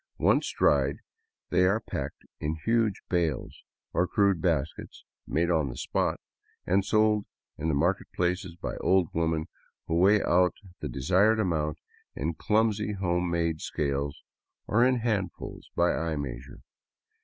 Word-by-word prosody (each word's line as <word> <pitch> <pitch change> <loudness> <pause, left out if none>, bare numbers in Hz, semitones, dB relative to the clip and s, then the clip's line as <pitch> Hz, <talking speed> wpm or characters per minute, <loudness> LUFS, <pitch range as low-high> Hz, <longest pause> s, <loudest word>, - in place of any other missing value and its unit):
Once - - +2
dried, 70 -1 +3 0.6
they 90 - +4
are 100 +4 +3
packed - - -6
in 75 +1 -2
huge 115 -3 +1
bales, 85 -6 -1 0.3
or 90 - +2
crude 100 -4 +2
baskets 80 -3 -2 0.2
made 85 +3 +1
on 80 -5 +1
the - - -7
spot, - - -1 0.5
and 95 +2 +2
sold 110 0 +2 0.3
in 80 - -2
the 80 - +2
marketplaces 90 +5 0
by 90 - -5
old 95 -3 +2
women 80 -1 0 0.4
who - - -3
weigh 100 +3 +5
out 90 +1 +3 0.2
the - - -4
desired 95 +11 +3
amount 80 -7 0 0.4
in 80 +4 -2
clumsy 105 +3 +1
home 90 -2 0
made 85 -2 0
scales, 70 -1 -2 0.4
or 115 +3 +3
in 130 +1 +4
handfuls 105 -6 -3
by 85 0 +3
eye 80 -1 -1
measure. 65 -3 -6
85 Hz, 140 wpm, -28 LUFS, 80-100 Hz, 0.6 s, weigh